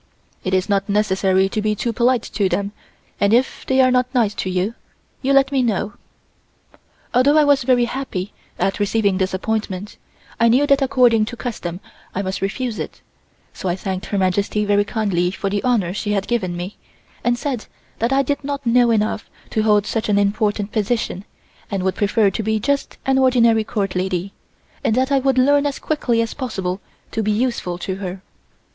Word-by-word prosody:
It 185 0 0
is 185 0 +1
not 200 0 0
necessary 190 -2 +2
to 215 - -2
be 215 0 0
too 230 +3 -2
polite 240 0 +2
to 200 -2 -1
them 200 +3 -1 0.5
and 200 +2 +4
if 255 +2 0
they 265 0 +4
are 255 0 +4
not 250 0 +2
nice 225 -4 +3
to 190 - -3
you, 185 +4 -1 0.5
you 275 - +1
let 275 0 +4
me 270 -2 +2
know." 215 -3 -1 1.2
Although 270 +5 +4
I 305 - +6
was 285 -1 +4
very 245 -1 +3
happy 230 -7 -4 0.2
at 195 - 0
receiving 205 -2 +1
this 190 0 0
appointment, 205 0 -3 0.4
I 230 - +5
knew 255 +5 +4
that 280 -1 +3
according 245 -5 +4
to 240 +2 -7
custom 185 -8 -5 0.3
I 195 - -1
must 190 0 -3
refuse 225 +4 -2
it, - - -6 0.5
so 190 - -4
I 175 - +1
thanked 190 0 -4
Her 205 - -2
Majesty 200 +3 +1
very 205 0 +3
kindly 200 -5 0
for 195 +1 -3
the 205 0 0
honor 220 -9 +1
she 205 +1 -2
had 200 -1 0
given 185 -8 -1
me 180 +4 -6 0.5
and 240 0 +2
said 255 -3 -3 0.3
that 230 +3 +1
I 275 +1 +3
did 285 +2 -2
not 280 -1 -4
know 240 0 +4
enough 215 -1 0 0.2
to 220 - +1
hold 210 -1 +3
such 220 0 -2
an 205 - +3
important 205 0 0
position 215 -3 -1 0.4
and 195 -2 -2
would 190 0 +1
prefer 205 +1 +2
to 220 - -2
be 220 0 0
just 280 +5 -1
an 265 0 +3
ordinary 235 -4 +4
Court 200 -4 -2
lady, 185 +1 -2 0.5
and 220 - +2
that 260 +2 +1
I 275 - +4
would 265 -1 +1
learn 285 +3 +4
as 280 - -3
quickly 240 -7 0
as 230 - -5
possible 195 -8 -3 0.3
to 225 - -1
be 215 - -1
useful 215 -6 -1
to 190 +1 -4
her. 190 -1 -6
215 Hz, 195 wpm, -20 LUFS, 195-250 Hz, 1.2 s, I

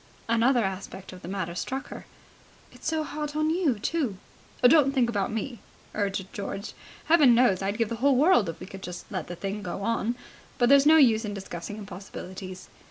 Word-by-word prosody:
Another 235 +2 +3
aspect 190 -1 -5
of 180 - -11
the - - -9
matter 185 -3 -3
struck 265 +10 -4
her. - - -9 0.6
"It's - - -9
so 315 0 0
hard 300 0 -5
on 310 +1 +1
you, 325 - +1
too." 250 - -1 0.5
"Don't 275 +1 +6
think 240 -3 +3
about 205 +1 -1
me," 225 +2 -4 0.3
urged 195 -2 -2
George. 200 0 -5 0.3
"Heaven 295 -7 +6
knows 230 -6 +3
I'd 200 +2 -2
give 230 -2 0
the 230 - -2
whole 275 +3 +3
world 255 - +4
if 165 - -7
we - - -7
could 195 0 -10
just 180 -1 -7
let 185 -5 -4
the 175 - -6
thing 200 +3 -4
go 185 +1 -5
on, 230 +1 0 0.4
but 240 -1 +3
there's 280 +1 +6
no 320 +1 +8
use 230 -7 +5
discussing 200 -2 -6
impossibilities." 185 -2 -8
220 Hz, 190 wpm, -27 LUFS, 195-270 Hz, 0.6 s, no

